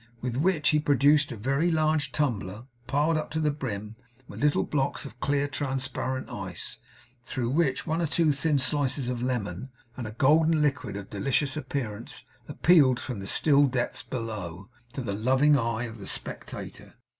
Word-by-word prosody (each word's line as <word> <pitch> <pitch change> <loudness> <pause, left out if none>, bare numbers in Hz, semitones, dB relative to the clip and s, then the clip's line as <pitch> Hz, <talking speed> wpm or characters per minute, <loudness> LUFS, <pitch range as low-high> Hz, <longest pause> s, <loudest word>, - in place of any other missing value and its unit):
With 125 -1 -3
which 155 +2 +2
he 150 - +4
produced 145 0 +4
a - - -4
very 140 +10 +1
large 155 -4 +1
tumbler, 110 -8 -1 0.2
piled 150 +4 +2
up 155 - -3
to 160 - -2
the 150 -1 +2
brim 110 -6 -5 0.3
with - - -9
little 145 0 +3
blocks 140 -2 -1
of 125 -3 -10
clear 145 +1 +1
transparent 130 -2 -3
ice, - - -6 0.4
through 120 -2 -2
which 145 -2 +1
one 160 +2 0
or 165 - +1
two 160 0 +3
thin 145 +1 +1
slices 135 -1 +1
of 125 -1 -3
lemon, 120 -3 -2 0.3
and 120 -3 -5
a - - -6
golden 155 +6 +4
liquid 145 -8 0
of 100 -1 -9
delicious 135 +6 0
appearance, 130 -3 -4 0.2
appealed 145 -4 +4
from 125 -6 -5
the 95 - -6
still 145 +3 +4
depths 125 -2 -2
below, 105 -5 -6 0.2
to 135 - -4
the 100 -4 -2
loving 130 +8 +4
eye 115 -2 0
of 115 -2 -7
the 100 - -8
spectator. - - -5
135 Hz, 170 wpm, -27 LUFS, 120-150 Hz, 0.4 s, he